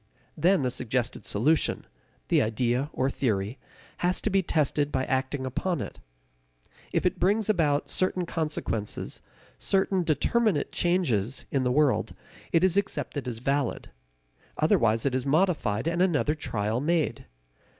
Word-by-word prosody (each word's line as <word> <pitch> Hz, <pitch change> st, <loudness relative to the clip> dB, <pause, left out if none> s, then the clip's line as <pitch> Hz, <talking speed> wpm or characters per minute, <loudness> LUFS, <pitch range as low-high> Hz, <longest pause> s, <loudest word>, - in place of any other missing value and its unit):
Then 175 Hz, +1 st, +3 dB
the 125 Hz, -, 0 dB
suggested 125 Hz, 0 st, -2 dB
solution 145 Hz, +10 st, +1 dB, 0.4 s
the -, -, +4 dB
idea 120 Hz, +5 st, 0 dB
or 130 Hz, -, 0 dB
theory 110 Hz, -4 st, -1 dB, 0.4 s
has 180 Hz, +1 st, +1 dB
to 215 Hz, -, -1 dB
be 195 Hz, 0 st, +3 dB
tested 150 Hz, -3 st, 0 dB
by 130 Hz, -1 st, 0 dB
acting 130 Hz, +1 st, -1 dB
upon 170 Hz, +7 st, -2 dB
it. -, -, -6 dB, 0.9 s
If -, -, 0 dB
it -, -, +1 dB
brings 210 Hz, +4 st, +2 dB
about 150 Hz, -7 st, +1 dB
certain 185 Hz, -1 st, 0 dB
consequences, 150 Hz, -11 st, -3 dB, 0.4 s
certain 190 Hz, -1 st, +2 dB
determinate 170 Hz, -, +1 dB
changes, 135 Hz, -, 0 dB
in 135 Hz, -, +1 dB
the 125 Hz, -, +1 dB
world, 145 Hz, 0 st, +2 dB, 0.4 s
it 165 Hz, -, +3 dB
is 185 Hz, 0 st, +3 dB
accepted 175 Hz, -8 st, -2 dB
as 120 Hz, -2 st, -3 dB
valid. 135 Hz, +2 st, -1 dB, 0.7 s
Otherwise 115 Hz, +1 st, +2 dB
it 135 Hz, -, +1 dB
is 130 Hz, -1 st, 0 dB
modified, 155 Hz, -, +1 dB
and 170 Hz, +1 st, 0 dB
another 155 Hz, -5 st, +2 dB
trial 110 Hz, -6 st, -2 dB
made. 160 Hz, +1 st, 0 dB
145 Hz, 140 wpm, -27 LUFS, 125-175 Hz, 0.9 s, the